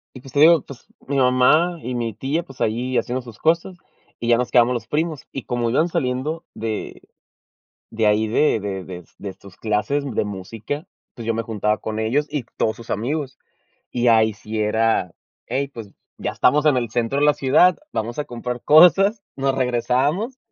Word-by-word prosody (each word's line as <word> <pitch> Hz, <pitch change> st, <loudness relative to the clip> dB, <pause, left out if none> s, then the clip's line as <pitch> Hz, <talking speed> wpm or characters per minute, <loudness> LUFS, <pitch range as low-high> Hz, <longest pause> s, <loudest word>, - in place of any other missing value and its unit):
Y, 130 Hz, -, -9 dB
pues, 130 Hz, 0 st, -13 dB
te 140 Hz, -, +1 dB
digo, 160 Hz, -1 st, +7 dB
pues, 135 Hz, -3 st, -13 dB, 0.2 s
mi 140 Hz, -, -2 dB
mamá 135 Hz, +7 st, +3 dB
y 125 Hz, -, -4 dB
mi 115 Hz, -3 st, -2 dB
tía, 135 Hz, -, -2 dB
pues 135 Hz, -5 st, -15 dB
ahí 125 Hz, +4 st, -1 dB
haciendo 125 Hz, +1 st, -2 dB
sus 120 Hz, -3 st, -12 dB
cosas 170 Hz, +3 st, +1 dB, 0.4 s
y 120 Hz, -, -3 dB
ya 120 Hz, -, +5 dB
nos 125 Hz, 0 st, -1 dB
quedamos 125 Hz, 0 st, +4 dB
los 115 Hz, -2 st, -5 dB
primos, 155 Hz, -1 st, -2 dB
y 135 Hz, -, -5 dB
como 120 Hz, -1 st, -1 dB
iban 155 Hz, +8 st, +2 dB
saliendo 135 Hz, +2 st, -2 dB
de 110 Hz, -1 st, -5 dB, 0.9 s
de 110 Hz, -1 st, +1 dB
ahí, 105 Hz, +1 st, +2 dB
de 115 Hz, +2 st, +2 dB
de 95 Hz, -2 st, -4 dB
de 90 Hz, -1 st, -9 dB, 0.2 s
de 100 Hz, -2 st, -6 dB
sus 95 Hz, -1 st, -16 dB
clases 110 Hz, +7 st, 0 dB
de -, -, +1 dB
música, 110 Hz, -, -6 dB, 0.3 s
pues 115 Hz, -, -9 dB
yo 115 Hz, -, +1 dB
me 115 Hz, -, -2 dB
juntaba 105 Hz, -1 st, -1 dB
con 110 Hz, 0 st, -5 dB
ellos 125 Hz, +7 st, +1 dB
y 145 Hz, -5 st, -3 dB
todos 110 Hz, -, +1 dB
sus 115 Hz, -, -13 dB
amigos. 135 Hz, +5 st, -2 dB, 0.5 s
Y 120 Hz, 0 st, 0 dB
ahí 110 Hz, -1 st, +4 dB
sí 110 Hz, +1 st, -6 dB
era, 110 Hz, -3 st, +1 dB, 0.4 s
hey, 135 Hz, +3 st, -1 dB
pues 110 Hz, -3 st, -8 dB, 0.3 s
ya -, -, -3 dB
estamos 150 Hz, +3 st, +2 dB
en 145 Hz, -4 st, +4 dB
el 120 Hz, -2 st, -1 dB
centro 120 Hz, +4 st, -1 dB
de 145 Hz, -, +3 dB
la 150 Hz, -, +5 dB
ciudad, 145 Hz, +8 st, +4 dB
vamos 120 Hz, +5 st, -3 dB
a 150 Hz, -, -2 dB
comprar 120 Hz, 0 st, -5 dB
cosas, 195 Hz, +7 st, +6 dB
nos 135 Hz, 0 st, 0 dB
regresábamos 135 Hz, -, 0 dB
125 Hz, 195 wpm, -21 LUFS, 110-145 Hz, 0.9 s, digo